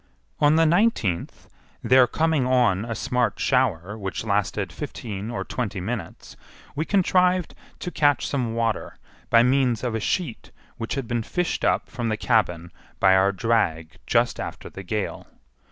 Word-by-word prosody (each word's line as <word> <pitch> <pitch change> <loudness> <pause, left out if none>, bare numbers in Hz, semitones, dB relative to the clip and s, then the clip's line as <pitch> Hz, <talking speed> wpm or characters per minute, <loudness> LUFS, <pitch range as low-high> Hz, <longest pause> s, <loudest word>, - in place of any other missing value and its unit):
On 145 +1 +4
the 165 0 +4
nineteenth, 165 - 0 0.4
there 130 -1 +5
coming 155 0 +1
on 120 -6 +2
a 115 -1 -4
smart 125 +1 -1
shower 105 -8 +1
which 95 -2 -5
lasted 100 -1 -1
fifteen 110 -8 -6
or 120 - -3
twenty 110 -6 -3
minutes, 100 -2 -6 0.4
we 155 +3 -1
contrived 180 -2 +2 0.2
to 180 - -5
catch 145 -5 +2
some 120 -5 -2
water 115 -1 -2 0.3
by 115 0 +6
means 125 -2 +2
of 120 -3 -1
a 115 - -1
sheet 135 - -2 0.3
which 115 - -3
had 135 -4 -4
been 120 0 -1
fished 180 +10 -2
up - - +1
from 120 -1 -3
the 110 - -1
cabin 90 -8 0 0.3
by 95 -1 +5
our 95 +1 +4
drag 90 -6 0
just - - +2
after - - -6
the 95 - -8
gale. 100 +2 -4
115 Hz, 155 wpm, -24 LUFS, 100-135 Hz, 0.4 s, by